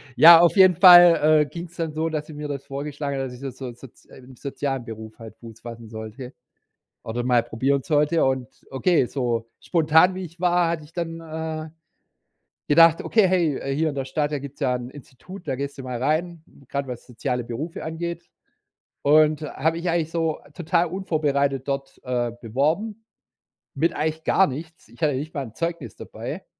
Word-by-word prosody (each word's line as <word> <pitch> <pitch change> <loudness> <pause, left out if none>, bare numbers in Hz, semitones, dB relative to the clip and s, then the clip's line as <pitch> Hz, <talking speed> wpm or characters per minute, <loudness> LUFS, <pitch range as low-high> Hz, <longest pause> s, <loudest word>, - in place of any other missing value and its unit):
Ja, 165 +1 +10
auf 170 -1 +4
jeden 185 -2 +6
Fall, 175 -4 +8
äh, 150 - +2
ging's 170 +3 -9
dann 160 -2 -3
so, 160 +1 -1
dass 155 -1 -3
sie 155 - -10
mir 150 0 -6
das 140 -2 -5
vorgeschlagen 140 0 -4
hat, 135 - -2
dass 125 - -9
ich 125 - -12
so 135 -1 -5
so 125 -1 -8
soz 125 0 -16
äh, - - -16
im 130 0 -15
sozialen 135 -3 -4
Beruf 110 0 -9
halt 110 -1 -11
Fuß 115 -1 -13
fassen 115 -2 -10
sollte 110 +4 -8 0.7
oder 120 +2 -4
mal 125 -2 +3
probieren 130 +4 -1
sollte 150 +2 +2
und 130 -3 -1 0.2
okay, 135 0 +2
so 120 -4 -2
spontan 160 +2 +3
wie 185 0 -5
ich 170 +1 -12
war, 175 -1 +2
hatte 165 -2 -3
ich 155 - -18
dann, 165 -1 -4
äh, 160 -1 -5 1.0
gedacht: 165 +2 +5
„Okay, 220 -4 +3
hey, 170 -6 +1
äh, 135 0 -3
hier 160 +2 +1
in 140 - -6
der 135 - -3
Stadt, 145 +3 -2
da 145 - -2
gibt's 140 0 -10
ja 125 - +1
'n 125 0 -6
Institut, 145 +7 -13
da 130 - -1
gehst 140 +1 -5
du 135 - -7
mal 125 -1 -5
rein, 160 +3 -1 0.2
grad 140 0 -3
was 125 -2 -7
soziale 125 0 -3
Berufe 140 +9 -6
angeht.“, 170 +1 -5 0.8
und 155 +1 +4
habe 160 +3 -1
mich 170 +1 -2
eigentlich 165 -2 0
so 165 -2 -1
total 170 +1 0
unvorbereitet 145 -7 -1
dort, 135 0 -4
äh, 120 -2 -1
beworben, 160 - -1 0.7
mit 165 +4 +1
eigentlich 160 +1 -2
gar 195 - +3
nichts. 160 +5 -8
Ich - - -20
hatte 150 -2 +3
nicht 150 +4 -5
mal 140 -3 -3
'n 110 - -12
Zeugnis 165 - -4
dabei. - - -7
150 Hz, 195 wpm, -23 LUFS, 130-165 Hz, 1.0 s, Ja